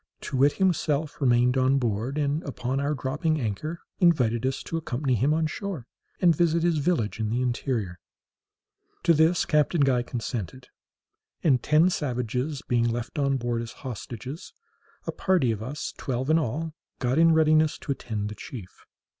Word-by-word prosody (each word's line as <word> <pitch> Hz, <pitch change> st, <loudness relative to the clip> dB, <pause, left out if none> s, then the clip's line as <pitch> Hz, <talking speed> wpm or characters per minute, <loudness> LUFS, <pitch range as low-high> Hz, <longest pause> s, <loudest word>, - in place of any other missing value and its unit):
Too 130 Hz, -, -4 dB
wit 140 Hz, +3 st, +4 dB
himself 155 Hz, -5 st, 0 dB
remained 125 Hz, 0 st, +3 dB
on 130 Hz, +1 st, +3 dB
board, 120 Hz, +2 st, -1 dB
and, 145 Hz, +1 st, 0 dB
upon 135 Hz, -2 st, -3 dB
our 145 Hz, +2 st, 0 dB
dropping 150 Hz, +4 st, -1 dB
anchor, 140 Hz, +9 st, -3 dB, 0.2 s
invited 130 Hz, -9 st, +3 dB
us 135 Hz, 0 st, -3 dB
to -, -, -5 dB
accompany 135 Hz, -3 st, -1 dB
him 125 Hz, +6 st, +2 dB
on 160 Hz, +1 st, +2 dB
shore, 165 Hz, -, -4 dB, 0.3 s
and 175 Hz, -3 st, +5 dB
visit 170 Hz, +1 st, +2 dB
his 170 Hz, -3 st, +2 dB
village 140 Hz, -9 st, 0 dB
in 110 Hz, -1 st, -1 dB
the 120 Hz, +3 st, 0 dB
interior. 120 Hz, -7 st, -2 dB, 1.0 s
To 170 Hz, -, +5 dB
this 160 Hz, +3 st, +3 dB
Captain 150 Hz, +1 st, +2 dB
Guy 130 Hz, -3 st, +3 dB
consented; 120 Hz, 0 st, -5 dB, 0.7 s
and 135 Hz, -7 st, +4 dB
ten 155 Hz, +4 st, +4 dB
savages 125 Hz, 0 st, -2 dB
being 120 Hz, -1 st, +2 dB
left 120 Hz, +4 st, -4 dB
on 140 Hz, -1 st, +2 dB
board 120 Hz, -1 st, -2 dB
as 115 Hz, 0 st, -7 dB
hostages, 125 Hz, -, -7 dB, 0.5 s
a -, -, -2 dB
party 180 Hz, -11 st, +2 dB
of 110 Hz, -2 st, -4 dB
us, 135 Hz, +6 st, -5 dB
twelve 130 Hz, +2 st, -1 dB
in 160 Hz, -, +5 dB
all, 155 Hz, +4 st, -3 dB, 0.2 s
got 130 Hz, +3 st, 0 dB
in 165 Hz, 0 st, +6 dB
readiness 155 Hz, -1 st, +4 dB
to -, -, -5 dB
attend 105 Hz, -6 st, -3 dB
the -, -, -6 dB
chief. 100 Hz, -8 st, -10 dB
135 Hz, 165 wpm, -26 LUFS, 120-155 Hz, 1.0 s, in